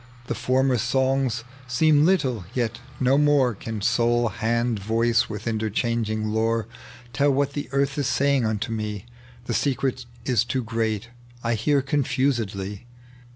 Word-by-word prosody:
The - - -2
former 130 -1 +1
songs 130 -1 +1 0.2
seem 150 +3 +4
little, 135 - +1
yet 120 -1 -1 0.2
no 130 +2 +3
more 145 -4 +4
Can 110 +1 -6
soul, 120 +2 +2
hand, 115 +2 0
voice, 115 +3 +1
with 105 0 -6
interchanging 110 0 -1
lore 115 +1 +1 0.5
Tell 145 +1 +3
what 140 +1 +1
the 145 - -4
earth 140 +1 0
is 140 - 0
saying 140 -2 +2
unto 110 +1 -1
me: 105 -2 -4 0.4
The 120 - -2
secret 130 -1 -1 0.2
is 120 -4 +2
too 130 +1 -2
great, 110 0 -2 0.3
I 115 0 +1
hear 135 +5 +1
confusedly. 125 -7 -1
120 Hz, 140 wpm, -24 LUFS, 110-135 Hz, 0.5 s, seem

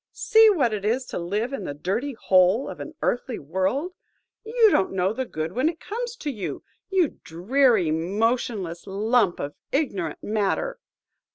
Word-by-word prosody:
See 445 0 +5
what 270 - +2
it 205 -2 -3
is 240 +5 0
to - - -3
live 210 +9 -2
in 210 -9 -4
the 145 - -5
dirty 215 - -2
hole 190 +2 +3
of - - -7
an 315 - -8
earthly 245 -1 -1
world! 190 - -1 0.5
You 450 0 +4
don't 195 - +2
know 190 +2 +1
the 260 +2 -3
good 160 -7 -4
when 260 +6 +2
it 330 - -7
comes 475 +2 -5
to 300 -11 -4
you, 210 -7 -5 0.3
you 370 -6 +1
dreary, 205 - +2
motionless 195 +1 -1
lump 210 0 +1
of 145 +1 -4 0.2
ignorant 200 - -2
matter! 220 - -1
225 Hz, 165 wpm, -24 LUFS, 185-280 Hz, 0.5 s, See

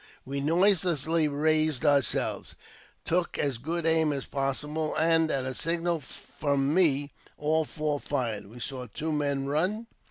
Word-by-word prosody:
We 140 +1 -3
noiselessly 165 -1 +3
raised 155 0 +1
ourselves, 140 -3 +1 0.5
took 175 0 0
as 135 -5 -1
good 165 +5 -3
aim 160 -1 +3
as 140 -2 -3
possible, 150 +3 -2
and, 165 0 +3
at 135 -3 -1
a 130 - -3
signal 170 +3 -1
from 140 0 -2
me, 145 -5 +3 0.3
all 155 +1 +1
four 150 -1 -2
fired. 120 -9 -3
We 115 +4 -12
saw 125 0 -5
two 155 +9 -3
men 140 -2 0
run. 180 +11 0
150 Hz, 145 wpm, -28 LUFS, 140-160 Hz, 0.5 s, noiselessly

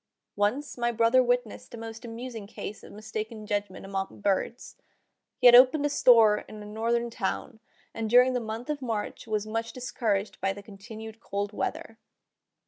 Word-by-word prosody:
Once 245 +7 -1
my 240 0 +1
brother 230 +2 +4
witnessed 245 -2 -1
a - - -9
most 225 +1 -8
amusing 230 -2 -7
case 210 0 -7
of - - -13
mistaken 215 +1 -6
judgment 205 -2 -3
among 195 0 -4
birds. 205 +4 -1 0.6
He 250 - -2
had 245 - +10
opened 260 +4 +7
a - - +2
store 225 -6 +6
in 215 -1 -9
a - - -10
northern 230 +3 -1
town, 220 0 -3 0.3
and 225 -1 -3
during 250 +2 +6
the 250 - +1
month 230 +4 -5
of 290 -2 -4
March 225 -3 -4
was 215 -1 -1
much 225 +1 -3
discouraged 220 -5 -2
by 195 +1 +1
the 200 +1 -11
continued 220 +2 -10
cold 200 -1 -4
weather. 225 +2 -4
225 Hz, 170 wpm, -28 LUFS, 210-240 Hz, 0.6 s, had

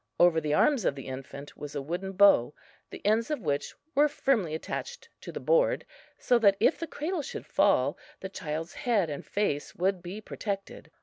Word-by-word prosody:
Over 175 -2 +5
the 150 -1 0
arms 275 - +3
of - - +1
the 135 - -8
infant 135 +2 -8
was 145 -1 -8
a 145 - -1
wooden 180 +6 -4
bow, 190 -9 +5 0.3
the - - -11
ends 220 +3 +2
of 300 - -1
which 145 -5 -2 0.2
were 295 +2 +5
firmly 240 - 0
attached 485 - -6
to - - -7
the - - -5
board, - - +2 0.3
so 245 -1 +3
that 200 -3 +5
if - - +3
the 335 - -4
cradle 320 +3 -3
should - - -7
fall - - +2 0.2
the 190 - -5
child's 160 -3 -5
head 220 - +1
and 145 - -5
face 200 -8 -2
would 185 +1 0
be 180 +4 -7
protected. 200 -2 -5
195 Hz, 190 wpm, -29 LUFS, 155-250 Hz, 0.3 s, Over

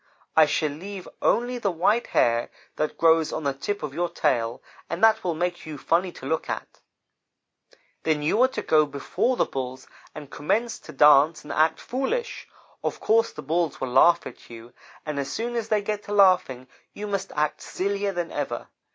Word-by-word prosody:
I 155 -1 +7
shall 150 0 0
leave 185 +5 -8
only 245 +1 +1
the 205 - 0
white 200 +7 +1
hair 115 0 +2 0.3
that 155 - -2
grows 165 -1 +4
on 160 - -4
the 140 -1 0
tip 205 +9 -4
of 145 -2 -4
your 175 +3 -1
tail, 120 -8 0 0.3
and 170 +4 -4
that 220 0 +5
will 175 -3 -1
make 175 0 -3
you 155 -2 -6
funny 175 +6 +1
to - - -11
look 160 +4 -2
at. - - -5 1.2
Then 155 -2 0
you 185 +10 +2
are 260 - +6
to - - -5
go 155 -1 +3
before 145 - -1
the - - +3
Bulls 130 -1 -5 0.3
and 145 -2 -9
commence 225 +10 -1
to - - -12
dance 150 +2 +5
and 150 - -6
act 155 +1 +2
foolish. 465 - -3 0.4
Of - - -2
course 225 +1 +2
the 150 - -9
Bulls 165 +1 -1
will 130 - -3
laugh 170 +7 +5
at - - -11
you, 115 +1 -12 0.3
and 150 -2 -3
as 140 - -3
soon 240 +2 -3
as 225 -2 -2
they 210 -1 +1
get 210 0 -2
to 205 - -5
laughing 185 -11 +3 0.3
you 210 - -6
must 195 -2 -3
act 150 0 -1
sillier 200 +1 -2
than 175 -2 -4
ever. 145 -1 -4
165 Hz, 195 wpm, -25 LUFS, 145-205 Hz, 1.2 s, I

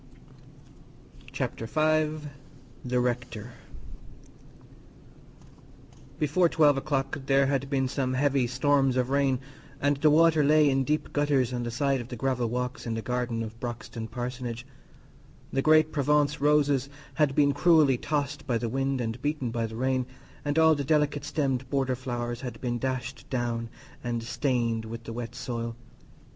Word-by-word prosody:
Chapter 115 - -3
V 155 +1 +1 0.6
The 125 0 0
Rector 120 -2 -2 2.7
Before 155 +4 +2
twelve 150 -3 +4
o'clock 135 0 -2
there 135 0 +4
had 135 0 -1
been 135 -2 +1
some 130 -1 -1
heavy 135 -2 +2
storms 135 +1 +2
of 125 +1 0
rain, 140 -2 +2 0.4
and 145 0 +2
the 150 +2 +4
water 160 0 +5
lay 150 0 +5
in 135 0 +1
deep 150 +2 -1
gutters 140 -4 +1
on 120 - -2
the 120 - -3
sides 135 +2 0
of 120 - -9
the 125 - -6
gravel 125 0 0
walks 125 +1 -3
in 115 - -2
the 115 - -4
garden 125 -2 -2
of 110 +1 -8
Broxton 115 -2 -5
Parsonage; 120 0 -5 0.9
the 135 - +2
great 155 +1 +5
Provence 145 0 +1
roses 145 -2 +3 0.2
had 150 -3 +1
been 140 -1 +4
cruelly 150 -4 +4
tossed 145 -1 -2
by 120 - +1
the 115 0 -2
wind 135 +2 -1
and 115 +1 -4
beaten 145 -4 -1
by 115 -1 -1
the 110 - -9
rain, 130 +1 0 0.4
and 145 +1 -1
all 160 0 +6
the 145 -2 -2
delicate 150 0 +1
stemmed 140 -4 -1
border 135 -2 0
flowers 120 -1 -4
had 125 -2 -6
been 120 -1 -2
dashed 130 0 -4
down 120 -2 -2 0.3
and 120 -1 -2
stained 120 -2 0
with 115 +1 -7
the 115 - -7
wet 120 0 -6
soil. 115 -2 -4
130 Hz, 155 wpm, -27 LUFS, 120-145 Hz, 2.7 s, all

